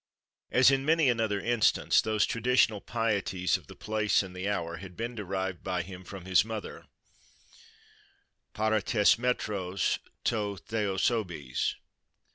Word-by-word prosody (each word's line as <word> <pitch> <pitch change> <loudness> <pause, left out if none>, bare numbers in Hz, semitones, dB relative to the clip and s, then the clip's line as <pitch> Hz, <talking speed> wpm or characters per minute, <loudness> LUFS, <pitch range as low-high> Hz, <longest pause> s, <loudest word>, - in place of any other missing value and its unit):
As 130 +2 +6
in 135 0 +1
many 160 -1 +3
another 110 -4 +1
instance, 120 +2 +3
those 110 -1 +1
traditional 115 -3 +2
pieties 100 -5 0
of - - -6
the - - -12
place 105 -1 +1
and 90 -1 -10
the 95 +2 -2
hour 85 -4 -2
had 90 0 -11
been 115 +2 -3
derived 95 -4 -4
by 90 -2 -1
him 95 0 -10
from 95 0 -9
his 95 -1 +4
mother:—para 110 0 -7
tês 105 +1 +3
mêtros 100 -6 -1 0.2
to 105 -3 -1
theosebes. 95 - -1
105 Hz, 125 wpm, -29 LUFS, 95-115 Hz, 0.2 s, As